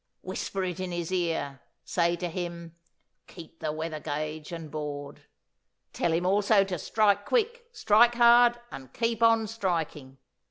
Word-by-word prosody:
Whisper 190 +1 -4
it 180 -1 -4
in 185 -1 -4
his 175 0 -4
ear. 165 -7 -2 0.2
Say 170 -1 +1
to 175 +1 -4
him, 170 -1 -6 0.5
'Keep 165 -2 -13
the 155 - -2
weather 155 0 -4
gauge 150 +1 -5
and 165 -3 -7
board!' 145 -2 -6 0.7
Tell 170 - 0
him 170 +2 0
also 200 +2 +4
to 185 -3 -4
strike 205 +3 +2
quick, 475 - -1
strike 235 - +4
hard, 240 0 +6
and 130 -2 -10
keep 230 -1 -1
on 225 -1 +4
striking. 165 -10 -3
175 Hz, 150 wpm, -27 LUFS, 160-215 Hz, 0.7 s, hard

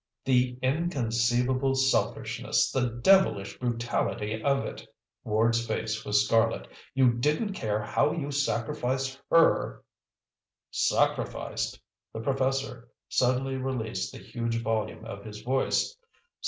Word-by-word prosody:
"The 125 -1 +2
inconceivable 130 -3 +1
selfishness, 135 0 +1
the 125 -2 +1
devilish 190 - +4
brutality 115 -3 -1
of 140 -1 +2
it!" - - -7 0.4
Ward's 115 +2 +2
face 110 0 -2
was 105 0 +3
scarlet. 115 +1 +2 0.3
"You 130 -2 +5
didn't 150 - 0
care 110 - -2
how 105 +7 +1
you 145 -4 -3
sacrificed 130 0 -1
her 165 0 +3 0.4
" - - -65 0.2
"Sacrificed!" - - -1 0.3
The 110 - -5
professor 135 -1 -1 0.2
suddenly 130 +1 +1
released 130 -4 -3
the - - -10
huge 115 0 -3
volume 110 0 -2
of 100 -3 -7
his 105 0 -9
voice. 130 - 0
125 Hz, 115 wpm, -28 LUFS, 115-135 Hz, 0.4 s, You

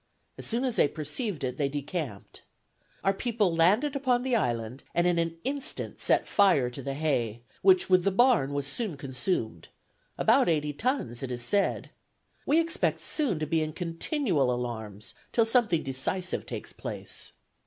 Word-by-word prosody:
As - - -6
soon 235 +3 0
as 250 -3 -1
they - - +5
perceived 160 - -2
it, 125 0 -2
they 140 -2 +1
decamped. 145 - -5 0.6
Our 195 - +3
people 210 -4 0
landed 210 - +3
upon 255 -3 +1
the 255 -2 +1
island, 120 - -1
and 175 - +3
in 175 -1 +2
an 165 0 -1
instant 275 +1 -4
set - - +2
fire 175 -12 +3
to 130 - -6
the 135 +1 -4
hay, 120 -7 -1 0.2
which, 185 -1 +5
with 185 -1 +4
the 195 - +3
barn, 215 - +3
was 140 -1 -2
soon 185 +1 -2
consumed, 130 - -2 0.5
about 245 -1 +4
eighty 150 -2 0
tons, 145 - -2
it 135 - -4
is 120 -1 -3
said. 200 +10 0 0.6
We 305 +3 +4
expect 330 0 0
soon 275 - 0
to - - +1
be 160 +1 +1
in 155 0 -3
continual 170 - 0
alarms, 110 -4 -5 0.2
till 230 - +3
something 225 -8 +2
decisive 140 +8 -2
takes - - -6
place. - - -7
165 Hz, 165 wpm, -28 LUFS, 135-225 Hz, 0.6 s, they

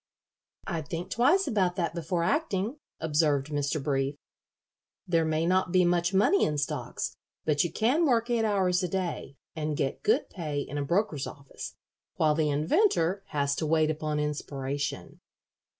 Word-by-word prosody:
"I'd 165 -6 -3
think 170 +3 -5
twice 320 +12 +4
about 185 -5 +1
that 170 -3 -1
before 170 0 -1
acting," 230 - 0 0.2
observed 150 -3 +1
Mr. 145 +1 0
Brief. 135 0 -1 0.9
"There 165 -2 +2
may 160 +1 +1
not 185 0 +2
be 185 -1 +4
much 175 0 +2
money 205 - +4
in 150 - +1
stocks, 145 - -3 0.3
but 150 -2 +3
you 175 - -2
can 275 +10 +2
work 235 -3 +2
eight 230 -2 +2
hours 190 -4 +2
a 180 - 0
day, 175 -6 -3 0.2
and 155 -2 -2
get 135 - -1
good 435 - +2
pay 150 -5 -3
in 145 +1 -4
a - - 0
broker's 160 -2 0
office, 140 -2 -9 0.4
while 155 -1 +3
the 155 0 +1
inventor 170 - +2
has 140 -1 0
to 155 - -1
wait 155 0 +3
upon 155 -1 -2
inspiration." 145 -1 -3
165 Hz, 160 wpm, -28 LUFS, 150-190 Hz, 0.9 s, twice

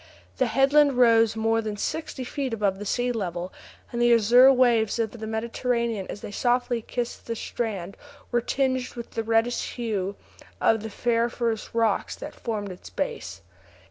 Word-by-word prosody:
The - - +2
headland 280 +1 +4
rose 230 -3 +4
more 225 +1 +1
than 215 -2 -4
sixty 295 +3 -3
feet 260 -1 -3
above 200 -3 0
the 205 - -5
sea 245 +4 0
level, 180 -5 -4 0.4
and 240 -1 -2
the 240 0 +5
azure 240 +4 +7
waters 240 -4 +3
of 225 -2 -1
the 220 -1 -7
Mediterranean, 230 -1 -1
as 205 - -6
they - - -7
softly 245 +1 +1
kissed 240 +2 -5
the 230 - -2
strand, 200 -6 -4 0.4
were 240 -1 +2
tinged 260 0 -1
with 235 -1 -7
the 225 - -2
reddish 225 +2 0
hue 205 -5 -2 0.4
of 225 -1 +3
the 220 - -5
ferriferous 235 0 -1
rocks 230 -1 +1
that - - -8
formed 210 -4 -4
its 180 - -11
base. - - -4
230 Hz, 165 wpm, -25 LUFS, 215-245 Hz, 0.4 s, azure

